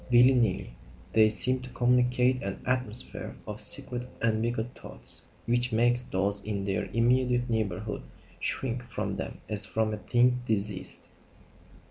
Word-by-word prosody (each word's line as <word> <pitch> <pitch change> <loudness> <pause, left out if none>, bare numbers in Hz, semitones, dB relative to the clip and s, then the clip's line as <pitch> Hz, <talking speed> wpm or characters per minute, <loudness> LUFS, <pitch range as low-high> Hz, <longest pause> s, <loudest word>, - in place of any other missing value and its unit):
Willy 125 +2 +7
nilly, 110 - 0 0.4
they 110 -1 +6
seem 130 +4 +2
to 125 0 -8
communicate 125 +1 +2
an 100 -1 -5
atmosphere 125 -3 -2
of - - -5
secret 125 0 +2
and 110 -1 +1
wicked 120 +1 -2
thoughts - - -7 0.2
which 120 +1 +1
makes 120 +2 +2
those 100 +1 0
in 100 -1 -3
their 95 -1 -1
immediate 125 +1 +1
neighbourhood 110 -5 -2 0.4
shrink 125 -2 -2
from 110 - -3
them - - -5
as 105 -1 +7
from 110 -1 0
a - - -3
thing 125 +3 +2
diseased. 105 -4 -3
120 Hz, 140 wpm, -28 LUFS, 105-125 Hz, 0.4 s, Willy